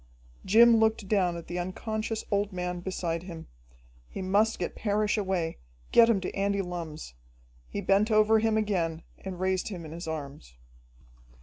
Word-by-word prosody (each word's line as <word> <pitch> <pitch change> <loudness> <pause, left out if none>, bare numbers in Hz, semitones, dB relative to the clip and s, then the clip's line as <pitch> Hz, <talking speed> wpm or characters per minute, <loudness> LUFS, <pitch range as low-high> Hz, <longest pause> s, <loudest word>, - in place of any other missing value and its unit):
Jim 230 +4 +6
looked 220 -2 +1
down 185 -4 +1
at 170 - -8
the 175 +1 -4
unconscious 215 +4 -3
old 200 0 +1
man 180 -1 -3
beside 175 -2 -3
him. 170 -3 -9 0.6
He 190 - -6
must 205 +4 +2
get 175 - -3
Parrish 210 0 0
away, 190 -6 -1 0.3
get 230 0 +7
him 220 -4 +3
to 180 - -4
Andy 200 0 0
Lumm's. 165 - -6 0.6
He 200 - -4
bent 200 +3 +3
over 215 0 +5
him 220 0 +1
again 170 -7 -1 0.2
and 185 -2 -7
raised 185 0 0
him 180 -6 -6
in 155 - -9
his 170 +1 -7
arms. 140 - -7
190 Hz, 165 wpm, -28 LUFS, 175-215 Hz, 0.6 s, get